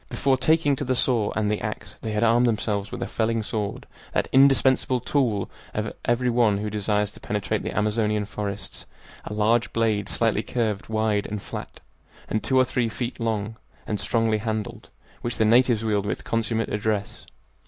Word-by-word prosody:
Before 135 -1 +2
taking 145 +2 +3
to - - -2
the 130 -1 0
saw 120 -4 +2
and 105 -1 +1
the 105 - -1
ax 105 0 -5
they 110 - -3
had 105 +1 0
armed 120 +2 +4
themselves 105 -2 -1
with - - -4
a - - -3
felling 115 0 0
sword, 105 -1 -3 0.3
that - - +1
indispensable 130 -1 +4
tool 115 -7 0 0.3
of - - -2
every 120 +1 +1
one 115 -4 +3
who 105 +1 -3
desires 105 0 0
to - - -15
penetrate 105 +1 -2
the - - -5
Amazonian 105 0 +1
forests, 100 -1 -6 0.4
a - - -5
large 110 +3 +2
blade 110 -3 +1
slightly 115 -2 +1
curved, 110 -5 -2
wide 110 -2 +1
and 105 0 -4
flat, - - -7 0.5
and 110 - -1
two 130 - +2
or 130 - +6
three 120 -2 0
feet 120 +4 -4
long, 110 -1 -2 0.3
and 105 - -2
strongly 115 -2 +1
handled, 110 -1 -4 0.3
which 120 - -3
the 110 - +3
natives 115 0 +4
wield 105 -2 0
with - - -3
consummate 115 0 -1
address. 105 -1 -2
110 Hz, 180 wpm, -25 LUFS, 105-120 Hz, 0.5 s, or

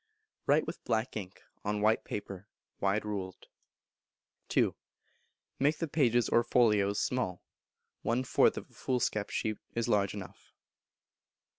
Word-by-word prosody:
write - - +4
with - - -6
black 115 +1 -1
ink, 95 -4 -7 0.2
on 105 +1 -1
white 110 +2 +3
paper, 100 -1 -6 0.3
wide 100 +2 +1
ruled. 95 -3 -5 1.1
ii. - - +5 0.9
Make 145 +3 +3
the 165 - -2
pages 120 -6 +3
or 120 - +4
folios 105 -4 +3
small, 105 -9 -1 0.6
one 120 +3 +1
fourth 125 - +3
of - - -7
a - - -23
foolscap 120 -5 -1
sheet 110 -1 -2 0.2
is 115 0 0
large 105 -3 +2
enough. 95 -4 -10
110 Hz, 130 wpm, -31 LUFS, 100-120 Hz, 1.1 s, ii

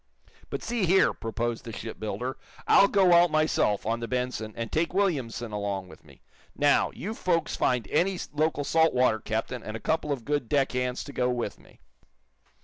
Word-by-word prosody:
"But, - - -4
see 230 -6 -1
here," 190 +3 +4
proposed 115 +1 -3
the 115 - -7
shipbuilder, 115 +3 -5 0.3
"I'll 200 - +7
go 190 -3 +4
out 170 +1 +6
myself, 155 -9 +1
on 115 +2 0
the 115 - -4
'Benson,' 125 -4 -3
and 115 -1 -5
take 165 +3 0
Williamson 130 - -1
along 100 -3 -3
with - - -15
me. - - -19 0.3
Now, 145 -1 +3
you 210 +4 -4
folks 175 -6 0
find 125 -4 0
any 185 +4 +2 0.2
local 155 -1 0
salt 160 +1 +3
water 125 -3 +3
captain 115 +3 -3
and 110 0 -6
a - - -12
couple 155 +1 -1
of 130 -5 -3
good 145 -5 -1
deck 140 -2 +2
hands 125 0 -2
to 140 - -10
go 125 0 +1
with 120 -4 -3
me." - - -21
125 Hz, 185 wpm, -27 LUFS, 115-160 Hz, 0.3 s, I'll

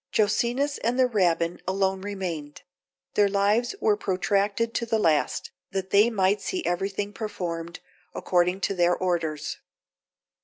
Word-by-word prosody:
Jocenus 240 +7 +1
and 235 +3 0
the 260 - +5
Rabbin 175 -7 +1
alone 190 0 0
remained. 180 -7 -5 0.5
Their 205 - +4
lives 205 +4 +1
were 215 -2 +3
protracted 200 +3 0
to 235 - -1
the 225 - +1
last, 160 -8 +1 0.2
that 190 -1 -3
they 205 +3 +6
might 200 -2 +1
see 365 -2 -3
everything 195 +3 -2
performed, 170 -6 -5 0.4
according 180 +1 +1
to 195 - 0
their 175 -1 +2
orders. 165 -5 -2
195 Hz, 130 wpm, -26 LUFS, 175-215 Hz, 0.5 s, they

